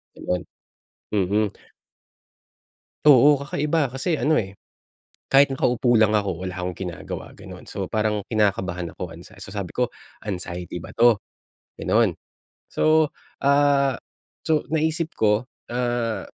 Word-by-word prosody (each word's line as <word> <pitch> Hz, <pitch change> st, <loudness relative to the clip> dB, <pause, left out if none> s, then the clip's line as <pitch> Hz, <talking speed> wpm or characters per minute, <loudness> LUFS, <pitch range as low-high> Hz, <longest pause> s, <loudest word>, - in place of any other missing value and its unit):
Gano'n. 90 Hz, 0 st, -3 dB, 0.7 s
Mhm. 105 Hz, +1 st, +1 dB, 1.6 s
Oo, 145 Hz, 0 st, +7 dB
kakaiba 145 Hz, +2 st, 0 dB
kasi 155 Hz, +4 st, -1 dB
ano 155 Hz, -, +2 dB
eh, 100 Hz, -8 st, -1 dB, 0.7 s
kahit 140 Hz, +1 st, +7 dB
nakaupo 125 Hz, -2 st, +1 dB
lang 110 Hz, -1 st, +5 dB
ako, 100 Hz, -4 st, 0 dB
wala 90 Hz, -, -3 dB
akong 90 Hz, 0 st, -3 dB
ginagawa 90 Hz, -4 st, -6 dB
gano'n. -, -, -11 dB
So -, -, -3 dB
parang 110 Hz, -1 st, 0 dB
kinakabahan 95 Hz, -6 st, 0 dB
ako, 85 Hz, -2 st, -7 dB
anxie 90 Hz, +2 st, -14 dB
so 95 Hz, -, -9 dB
sabi 100 Hz, -4 st, -4 dB
ko, 125 Hz, -1 st, 0 dB, 0.4 s
"Anxiety 90 Hz, -2 st, -5 dB
ba -, -, -9 dB
'to?" 115 Hz, -3 st, +4 dB, 0.6 s
Ganun. -, -, +3 dB, 0.6 s
So, 155 Hz, -1 st, +3 dB, 0.3 s
ah, 140 Hz, -1 st, +4 dB, 0.5 s
so 155 Hz, -1 st, +1 dB
naisip 160 Hz, +1 st, 0 dB
ko, 110 Hz, +3 st, +2 dB, 0.2 s
ah, 120 Hz, -2 st, -1 dB
115 Hz, 120 wpm, -23 LUFS, 95-140 Hz, 1.6 s, Oo